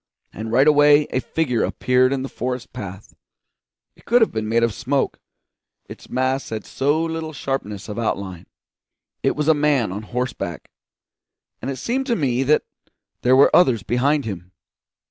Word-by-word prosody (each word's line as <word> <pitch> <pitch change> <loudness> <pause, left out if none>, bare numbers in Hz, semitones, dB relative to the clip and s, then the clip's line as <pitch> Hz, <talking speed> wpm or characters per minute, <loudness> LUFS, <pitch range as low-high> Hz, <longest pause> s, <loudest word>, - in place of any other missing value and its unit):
And 110 +1 -6
right 130 +5 +4
away 145 0 +6
a 130 - +1
figure 130 -4 -1
appeared 130 0 +2
in 135 -1 -1
the - - -3
forest 125 -1 -5
path; 100 -5 -8 0.8
it - - -22
could 240 +2 +4
have - - 0
been 110 -1 -3
made 115 +1 +2
of 115 -2 +1
smoke, 135 +5 -1 0.7
its - - -12
mass 130 +1 -1
had 110 -2 -5
so 145 +4 0
little 160 -1 -4
sharpness 120 -8 -4
of 105 +1 -5
outline. 95 -6 -3 0.7
It - - +1
was 150 +1 -1
a 160 - +6
man 145 -8 +1
on 100 +3 -5
horseback; 120 -7 -4 0.9
and - - -4
it 135 - -3
seemed 260 - -2
to 235 - +1
me 130 - 0
that 145 +3 +3 0.6
there 125 +1 +4
were 135 - +6
others 130 - +4
behind 140 +5 +1
him. 95 -3 -7
130 Hz, 165 wpm, -21 LUFS, 110-145 Hz, 0.9 s, away